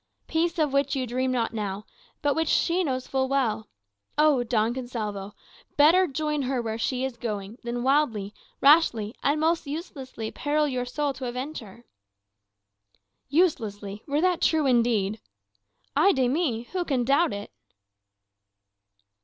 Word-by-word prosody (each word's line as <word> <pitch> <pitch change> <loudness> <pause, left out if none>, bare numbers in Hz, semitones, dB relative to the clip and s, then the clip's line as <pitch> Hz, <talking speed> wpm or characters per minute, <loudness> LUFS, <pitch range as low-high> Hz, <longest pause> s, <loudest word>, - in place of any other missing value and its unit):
Peace 335 +2 0
of 300 -4 +1
which 275 0 +1
you 260 -2 -1
dream 255 +2 -1
not 235 -3 -1
now, 205 -1 -4 0.4
but 290 -1 +3
which 320 +2 0
she 355 +2 +2
knows 255 -4 -2
full 265 -1 0
well. 225 -6 0 0.5
O 300 -4 +4
Don 225 -1 +1
Gonsalvo, 215 -6 -5 0.4
better 340 +6 +6
join 300 0 -2
her 260 -1 -1
where 225 -1 -3
she 255 +2 -1
is 260 -3 -5
going, 215 0 -5
than 240 0 -3
wildly, 250 -8 +1 0.3
rashly, 275 -8 +4
and 290 +2 +1
most 325 0 +1
uselessly 270 -7 -6
peril 300 +1 0
your 250 -3 -2
soul 285 +3 -2
to 260 -1 -6
avenge 255 +6 -4
her!" 225 +2 -14 1.4
"Uselessly! 220 - 0
Were 290 +1 +1
that 360 -1 +2
true 315 -2 +3
indeed 230 -5 +2 0.4
" 100 - -45
"Ay 365 +8 +5
de 260 -3 +2
mi! 255 -5 0
who 370 -1 -1
can 270 -7 0
doubt 280 +7 +3
it?" 205 0 -6
260 Hz, 150 wpm, -26 LUFS, 225-300 Hz, 1.4 s, better